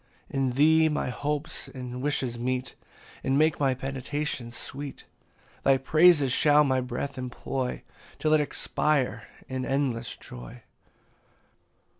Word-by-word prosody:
27 135 - -1
In 125 - -5
thee 160 +3 +5
my 150 -4 -1
hopes 150 +3 -3
and 125 -1 -7
wishes 130 -4 -1
meet, 130 +1 -2 0.5
And 135 +1 +2
make 155 +1 +3
my 135 -3 +2
meditations 135 -2 -4
sweet: 140 0 -7 0.6
Thy 135 - +4
praises 150 -1 +5
shall 150 +1 +5
my 130 -2 +2
breath 130 +2 -4
employ, 125 0 -3 0.3
Till 155 0 +2
it 155 - +5
expire 135 -5 0 0.2
in 130 0 -3
endless 130 -4 -1
joy. - - -11
135 Hz, 125 wpm, -27 LUFS, 125-150 Hz, 0.6 s, thee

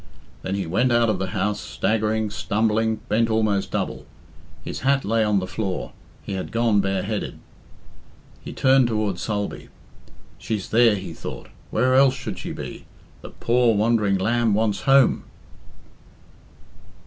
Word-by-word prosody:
Then 95 - -3
he 100 -2 -2
went 115 +10 +1
out 120 -1 +3
of 95 - -2
the 95 - -2
house, 100 +2 -1
staggering, 110 -1 -1
stumbling, 110 +1 0
bent 115 +2 +2
almost 110 -3 +1
double. - - -3 0.6
His - - -5
hat 135 +1 +1
lay 110 +2 +2
on 105 -1 +2
the 95 - 0
floor; 95 0 -4 0.3
he - - -5
had 95 - -4
gone 115 -3 +2
bareheaded. 95 +2 -2 1.1
He - - -7
turned 130 -2 +4
towards 105 -5 -1
Sulby. 105 -2 -3 0.7
"She's 105 -4 -4
there," 115 -1 +5
he 95 -4 -6
thought - - -8 0.2
"Where 130 +3 +2
else 135 0 +5
should - - -6
she - - -5
be? - - -7 0.4
The - - -9
poor, 120 -1 +2
wandering 105 -2 +2
lamb 115 +2 +1
wants 105 -1 0
home." 135 -2 +4
110 Hz, 145 wpm, -23 LUFS, 100-115 Hz, 1.1 s, there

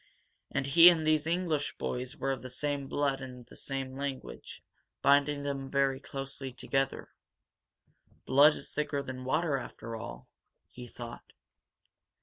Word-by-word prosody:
And 135 0 -1
he 165 +5 +9
and 165 -3 +1
these 155 0 +2
English 165 -4 -1
boys 125 0 -3
were 135 - -1
of 135 - -3
the 130 - -7
same 140 +1 -2
blood 140 -1 0
and 125 -2 -9
the - - -15
same 135 -1 -4
language, 140 -1 -6 0.4
binding 145 +1 +4
them 135 -1 -3
very 135 -1 +2
closely 135 -1 -5
together. 135 +1 -1 1.1
"Blood 145 +4 +6
is - - -5
thicker 145 -1 -1
than 130 -1 -7
water, 150 +2 +1
after 115 -2 -7
all!" - - -8 0.4
he 120 +5 -9
thought. 120 0 -10
135 Hz, 140 wpm, -31 LUFS, 130-145 Hz, 1.1 s, he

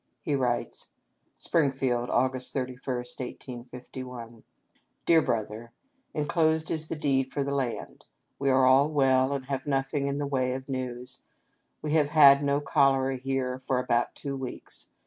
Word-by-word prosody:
He 150 - -1
writes: 125 -3 -1 0.5
"Springfield, 130 -5 0
Aug. 130 0 +2
31, 130 0 -3
1851. 125 -1 -7 0.3
" - - -39
Dear 165 -1 +5
Brother: 115 -1 -3 0.2
" 265 -1 -44
Inclosed 160 +1 +1
is 160 -1 -2
the - - -3
deed 135 -3 0
for 140 - -1
the 140 0 -2
land. 130 -4 -3 0.3
We 140 - +1
are 130 0 +4
all 135 +3 +5
well, 135 -3 +3
and 140 -2 -3
have 135 +1 -4
nothing 140 +1 0
in 140 0 -1
the 145 - -1
way 130 -2 0
of 130 0 -7
news. 125 -2 -4 0.6
We 150 - -2
have 150 -2 +3
had 140 -2 +7
no 140 0 +1
cholera 135 -2 +2
here 130 0 -2
for 130 0 -1
about 120 -1 0
two 140 -2 -4
weeks. 130 -2 -7
135 Hz, 155 wpm, -28 LUFS, 125-140 Hz, 0.6 s, had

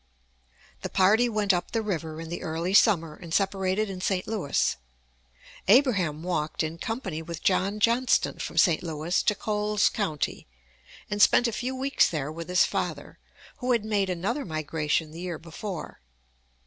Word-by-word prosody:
The - - -4
party 215 +6 +4
went 210 -3 +2
up 175 0 -1
the 225 -1 -1
river 160 -6 -3
in 165 0 -7
the 175 - -5
early 165 +3 -2
summer 165 -7 +4
and 170 0 -11
separated 195 +2 +1
in 190 -2 -6
St. 185 -1 0
Louis. 205 -11 0 0.9
Abraham 195 - +3
walked 160 -3 -1
in 160 +1 -4
company 195 -8 -4
with 170 0 -7
John 195 +2 +1
Johnston 235 +4 +2
from - - -5
St. 170 -4 +4
Louis 160 +1 -1
to 210 - +1
Coles 210 -1 +1
County, 180 -10 -3 0.6
and 205 0 0
spent 240 - +6
a - - -1
few 250 +4 -3
weeks 270 +1 +2
there 150 -3 -3
with 165 +2 -7
his 180 - +4
father, - - -4 0.4
who 250 -1 0
had 230 -3 0
made 205 -3 0
another 185 - -2
migration 155 -1 -2
the 165 - -9
year 175 -3 -4
before. 170 - -7
185 Hz, 160 wpm, -27 LUFS, 160-210 Hz, 0.9 s, spent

